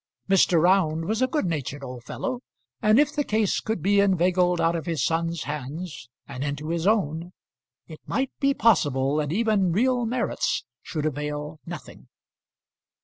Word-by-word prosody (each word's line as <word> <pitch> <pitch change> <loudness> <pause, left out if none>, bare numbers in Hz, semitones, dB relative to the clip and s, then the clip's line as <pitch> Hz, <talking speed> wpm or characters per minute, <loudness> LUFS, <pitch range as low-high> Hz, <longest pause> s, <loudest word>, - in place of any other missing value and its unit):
Mr. 185 -3 +4
Round 165 -2 +3
was 220 +5 -1
a 255 - +4
good 295 -3 -1
natured 145 -4 -3
old 125 -2 -7
fellow, 255 - -4 0.4
and 215 +4 +5
if 295 0 +3
the 295 - 0
case 215 -5 +1
could 220 -7 -3
be 200 +1 +4
inveigled 180 -2 +3
out 165 +1 +2
of 165 +1 -4
his 165 -3 0
son's 165 0 -1
hands 150 0 -6 0.2
and 130 - -5
into 145 +2 -3
his 170 +2 -1
own, 175 -5 0 0.5
it 155 -2 -11
might 265 0 -1
be 275 0 +2
possible 145 - +2
that 150 -1 -1
even 205 -2 +2
real 245 +5 +2
merits 245 +1 -1 0.2
should 155 -2 -4
avail 150 +1 -3
nothing. 175 -1 -9
170 Hz, 160 wpm, -25 LUFS, 150-215 Hz, 0.5 s, and